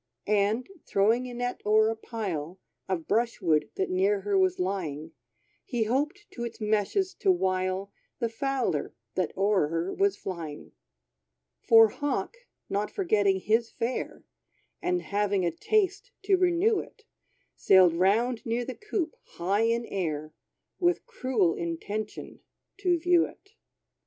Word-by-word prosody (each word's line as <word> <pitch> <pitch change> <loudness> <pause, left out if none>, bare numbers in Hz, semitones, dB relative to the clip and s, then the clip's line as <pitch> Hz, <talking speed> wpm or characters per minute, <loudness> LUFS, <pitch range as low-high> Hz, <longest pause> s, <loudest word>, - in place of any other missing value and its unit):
And, 210 +3 +1 0.2
throwing 225 +6 +2
a - - -8
net 245 0 -3
o'er 215 +1 +4
a - - -3
pile 190 -7 -5 0.3
Of 175 -4 -2
brush 230 +2 +1
wood 160 -5 +2
that 190 - -1
near 195 +2 +2
her 200 0 -1
was 185 -1 +3
lying, 165 -5 -3 0.5
He 235 -2 -1
hoped 295 - -1
to 235 - -6
its 235 -1 -6
meshes 215 - 0
to 390 - +4
wile 185 - 0 0.3
The 235 - 0
fowler, 250 - -2 0.2
that 185 -4 -1
o'er 195 -5 +3
her 165 +4 -2
was 395 0 +1
flying. 165 -5 -7 0.9
For 225 -1 +7
Hawk, 290 - -2 0.3
not 205 +1 -1
forgetting 205 - +1
his 225 +3 +2
fare, 240 +2 -4 0.6
And 360 0 0
having 200 -2 0
a 170 - +1
taste 405 - 0
to 390 0 +4
renew 370 +4 +3
it, 440 - -11 0.5
Sailed 185 -3 +5
round 220 +7 +2
near 235 +1 -1
the 260 - -4
coop, 400 -4 -3 0.2
high 195 +6 +1
in 235 +1 +1
air, 155 -6 -3 0.5
With 350 0 +1
cruel 255 - +1
intention, 200 +6 -5 0.4
to 360 -3 +2
view 345 0 +3
it. 400 - -18
215 Hz, 140 wpm, -28 LUFS, 190-270 Hz, 0.9 s, For